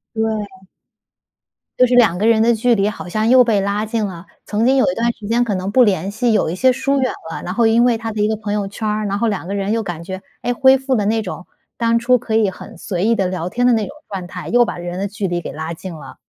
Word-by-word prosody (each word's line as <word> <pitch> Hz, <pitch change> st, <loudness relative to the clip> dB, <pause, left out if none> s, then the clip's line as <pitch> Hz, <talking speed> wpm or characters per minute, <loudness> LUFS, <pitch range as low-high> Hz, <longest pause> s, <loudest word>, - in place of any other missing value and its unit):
对。 210 Hz, -4 st, -3 dB, 1.1 s
就 255 Hz, -, +6 dB
是 245 Hz, -, 0 dB
两 220 Hz, -8 st, +4 dB
个 215 Hz, -, +1 dB
人 225 Hz, -1 st, +4 dB
的 235 Hz, 0 st, +3 dB
距 240 Hz, +2 st, +3 dB
离 200 Hz, 0 st, +1 dB
好 195 Hz, -, -8 dB
像 215 Hz, +5 st, 0 dB
又 255 Hz, -1 st, +7 dB
被 215 Hz, -4 st, +2 dB
拉 200 Hz, +2 st, -1 dB
近 220 Hz, -1 st, -1 dB
了。 180 Hz, -2 st, -7 dB, 0.2 s
曾 220 Hz, +3 st, 0 dB
经 265 Hz, -, +4 dB
有 270 Hz, +1 st, +3 dB
一 -, -, -3 dB
段 235 Hz, +1 st, +1 dB
时 210 Hz, -2 st, -10 dB
间 240 Hz, +1 st, +2 dB
可 210 Hz, -4 st, -2 dB
能 185 Hz, +1 st, -3 dB
不 250 Hz, +3 st, +5 dB
联 190 Hz, -2 st, 0 dB
系， 235 Hz, +3 st, 0 dB
有 210 Hz, -, +1 dB
一 175 Hz, -, -4 dB
些 255 Hz, +5 st, +4 dB
疏 275 Hz, +2 st, 0 dB
远 255 Hz, -, 0 dB, 0.2 s
了， -, -, -5 dB
然 180 Hz, -, -4 dB
后 230 Hz, -1 st, +3 dB
因 235 Hz, +2 st, +4 dB
为 240 Hz, -2 st, +3 dB
他 225 Hz, 0 st, -5 dB
的 215 Hz, -, -4 dB
一 210 Hz, -, +3 dB
个 220 Hz, -, 0 dB
朋 210 Hz, -1 st, -5 dB
友 205 Hz, -1 st, -1 dB
圈 215 Hz, +2 st, -4 dB
儿， 210 Hz, 0 st, -1 dB
然 200 Hz, 0 st, -1 dB
后 230 Hz, -, +2 dB
两 195 Hz, -4 st, -3 dB
个 200 Hz, -, -4 dB
人 200 Hz, 0 st, -2 dB
又 225 Hz, +1 st, +1 dB
感 170 Hz, -3 st, -5 dB
觉， 190 Hz, +2 st, -6 dB, 0.2 s
诶， 245 Hz, -, 0 dB
恢 265 Hz, +2 st, +5 dB
复 265 Hz, -1 st, -1 dB
了 205 Hz, -, 0 dB
那 220 Hz, +1 st, +1 dB
种 185 Hz, -2 st, -7 dB, 0.3 s
当 230 Hz, 0 st, +1 dB
初 250 Hz, +1 st, +3 dB
可 225 Hz, -1 st, -4 dB
以 215 Hz, -3 st, +3 dB
很 185 Hz, -, -12 dB
随 180 Hz, +2 st, -3 dB
意 230 Hz, +1 st, +3 dB
地 195 Hz, -4 st, 0 dB
聊 180 Hz, -1 st, -3 dB
天 245 Hz, +5 st, -1 dB
的 250 Hz, -, +5 dB
那 220 Hz, -2 st, 0 dB
种 280 Hz, -, -10 dB
状 190 Hz, -3 st, -5 dB
态， 180 Hz, 0 st, -8 dB
又 240 Hz, +1 st, +4 dB
把 -, -, -5 dB
人 175 Hz, +1 st, -5 dB
的 200 Hz, -, -1 dB
距 200 Hz, -1 st, -3 dB
离 175 Hz, 0 st, -2 dB
给 -, -, -7 dB
拉 160 Hz, +2 st, -5 dB
近 175 Hz, +1 st, -8 dB
了。 135 Hz, -4 st, -11 dB
215 Hz, 315 characters per minute, -18 LUFS, 190-235 Hz, 1.1 s, 又